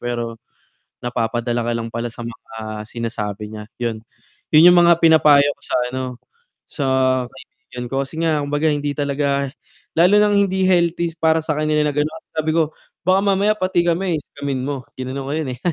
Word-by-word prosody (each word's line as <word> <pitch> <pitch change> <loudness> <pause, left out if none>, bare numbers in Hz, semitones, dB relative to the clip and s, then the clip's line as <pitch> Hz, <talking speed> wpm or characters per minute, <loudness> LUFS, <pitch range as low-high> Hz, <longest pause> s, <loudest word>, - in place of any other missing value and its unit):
pero 120 -2 -4 0.7
napapadala 120 0 -1
ka - - +1
lang 115 0 -4
pala 115 +1 -2
sa 120 0 -9
mga 110 -2 -7
sinasabi 105 -3 -5
niya, 105 - -7
'yon. 115 -2 -2 0.6
Yun 160 +3 +9
yung - - +5
mga 170 -1 +6
pinapayo 155 -3 +6
ko - - -37
sa - - -2 0.2
ano, 130 0 -3 0.7
sa 145 - -3 0.5
kaibigan 125 -2 -11
ko, 135 - -2
kasi 150 - -13
nga 155 -2 +1
kumbaga 145 +2 0
hindi 145 0 -1
talaga 140 -1 0 0.5
lalo 180 +5 +5
nang 210 -1 +3
hindi 190 -1 +1
healthy 170 -2 +2
para 160 0 +3
sa 155 -1 -1
kanila 155 0 +1
na 150 - 0
ganun. 155 +2 -2
Sabi 155 0 0
ko, 160 -2 +1 0.3
"Baka 185 +1 +5
mamaya 200 +1 +3
pati 185 -3 +1
kami 170 -1 +1
scammin 140 -2 -5
mo?" 140 -3 -4
Ginanon 130 +1 -5
ko - - -2
yun, 155 -4 -2
eh. - - -31
145 Hz, 175 wpm, -20 LUFS, 120-165 Hz, 0.7 s, Yun